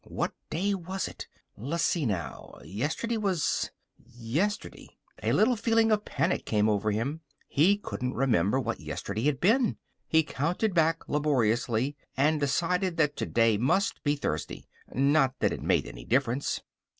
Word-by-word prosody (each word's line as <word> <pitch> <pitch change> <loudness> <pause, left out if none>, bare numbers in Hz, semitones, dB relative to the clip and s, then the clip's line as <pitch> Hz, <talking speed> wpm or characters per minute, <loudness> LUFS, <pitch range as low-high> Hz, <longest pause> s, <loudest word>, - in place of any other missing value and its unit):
What - - -2 0.2
day 195 +6 0
was 190 0 -3
it? - - -9 0.3
L'see 160 - 0
now. 90 -6 -4
Yesterday 145 - -2
was 195 -7 0 0.3
yesterday. 125 - -4 0.2
A - - 0
little 240 +4 +4
feeling 225 0 +2
of 210 -1 +1
panic 180 - 0
came 105 -1 +1
over 105 0 +1
him. 125 +10 -2 0.3
He 180 +8 +4
couldn't 125 -10 -4
remember 120 -3 +2
what 130 - -2
yesterday 110 +4 -4
had 145 -3 +1
been. 230 +6 +3 0.3
He 160 0 +4
counted 175 +9 -1
back 165 -1 +2
laboriously 130 -2 +1 0.2
and 150 +3 +3
decided 175 +5 0
that 150 -2 +2
today 115 -3 +2
must 200 - +1
be 145 0 +2
Thursday. 110 - -4 0.2
Not 135 -1 +2
that - - +1
it - - -6
made - - +2
any - - -9
difference. 130 - 0
145 Hz, 145 wpm, -28 LUFS, 120-185 Hz, 0.3 s, little